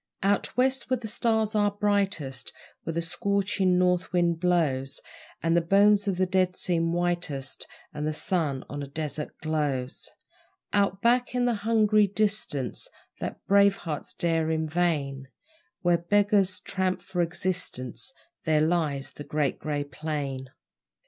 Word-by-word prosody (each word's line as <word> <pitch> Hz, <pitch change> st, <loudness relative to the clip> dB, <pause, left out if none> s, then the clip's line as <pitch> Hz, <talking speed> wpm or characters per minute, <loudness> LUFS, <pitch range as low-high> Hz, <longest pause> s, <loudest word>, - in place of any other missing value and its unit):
Out 200 Hz, +4 st, +1 dB
West, 265 Hz, +1 st, +1 dB
where 255 Hz, -, +2 dB
the 230 Hz, -2 st, -6 dB
stars 220 Hz, -1 st, +1 dB
are 205 Hz, -1 st, +3 dB
brightest, 200 Hz, -10 st, -1 dB, 0.3 s
Where 165 Hz, -, -4 dB
the 170 Hz, -, 0 dB
scorching 190 Hz, +1 st, +1 dB
north 180 Hz, 0 st, +2 dB
wind 175 Hz, -2 st, +2 dB
blows, 145 Hz, -7 st, +1 dB, 0.4 s
And 165 Hz, 0 st, +2 dB
the 170 Hz, -, +4 dB
bones 200 Hz, +4 st, +4 dB
of 190 Hz, -3 st, 0 dB
the 185 Hz, -, +3 dB
dead 185 Hz, 0 st, +1 dB
seem 165 Hz, -2 st, +1 dB
whitest, 170 Hz, -6 st, -2 dB, 0.3 s
And 150 Hz, 0 st, -3 dB
the -, -, +1 dB
sun 155 Hz, -4 st, -1 dB
on 145 Hz, 0 st, -5 dB
a 140 Hz, -, -5 dB
desert 150 Hz, +1 st, -4 dB
glows 145 Hz, -5 st, -1 dB, 0.6 s
Out 200 Hz, -1 st, +1 dB
back 245 Hz, +1 st, +3 dB
in 245 Hz, 0 st, +2 dB
the 245 Hz, -, +2 dB
hungry 215 Hz, -1 st, +3 dB
distance 200 Hz, -, 0 dB, 0.3 s
That -, -, -5 dB
brave 200 Hz, 0 st, +5 dB
hearts 155 Hz, -4 st, -6 dB
dare 165 Hz, -2 st, +1 dB
in 160 Hz, 0 st, 0 dB
vain 150 Hz, -5 st, -1 dB, 0.6 s
Where 175 Hz, -1 st, +3 dB
beggars 200 Hz, +1 st, +3 dB
tramp 185 Hz, -1 st, -1 dB
for 180 Hz, -1 st, -2 dB
existence 175 Hz, -, -1 dB, 0.3 s
There 155 Hz, -2 st, +3 dB
lies 155 Hz, -4 st, 0 dB
the 145 Hz, -, -8 dB
Great 150 Hz, -2 st, -1 dB
Grey 145 Hz, -1 st, -2 dB
Plain. 140 Hz, -2 st, -4 dB
175 Hz, 145 wpm, -27 LUFS, 150-200 Hz, 0.6 s, brave